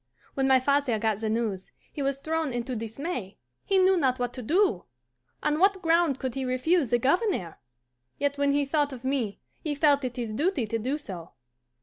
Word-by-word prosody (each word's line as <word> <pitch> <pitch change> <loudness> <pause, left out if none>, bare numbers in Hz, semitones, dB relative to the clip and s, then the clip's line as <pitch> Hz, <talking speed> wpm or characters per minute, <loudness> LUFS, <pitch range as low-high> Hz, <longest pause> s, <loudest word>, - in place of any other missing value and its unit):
"When 270 -1 +1
my 265 -1 +6
father 280 -3 +1
got 215 -1 0
the 220 -1 -2
news, 215 -4 -2 0.2
he 290 - -4
was 275 0 -1
thrown 315 -2 -1
into 245 +1 -3
dismay. 230 - -5 0.3
He 390 - +2
knew 380 0 +5
not 260 -6 +2
what 245 -1 -2
to 255 - -6
do. 315 - +2 0.6
On 300 +1 +1
what 390 +1 +4
ground 330 -4 +3
could 260 -2 -3
he 270 - -3
refuse 260 +4 +1
the 240 - +3
Governor? 275 - 0 0.6
Yet 285 0 0
when 285 0 +2
he 285 0 +2
thought 290 0 +1
of 250 -1 -9
me 260 -6 -1 0.2
he 300 -2 -3
felt 285 -1 +3
it 250 -1 -4
his 230 -3 -3
duty 300 - 0
to 225 +2 -2
do 260 +7 -1
so. 185 - -9
270 Hz, 200 wpm, -27 LUFS, 235-300 Hz, 0.6 s, my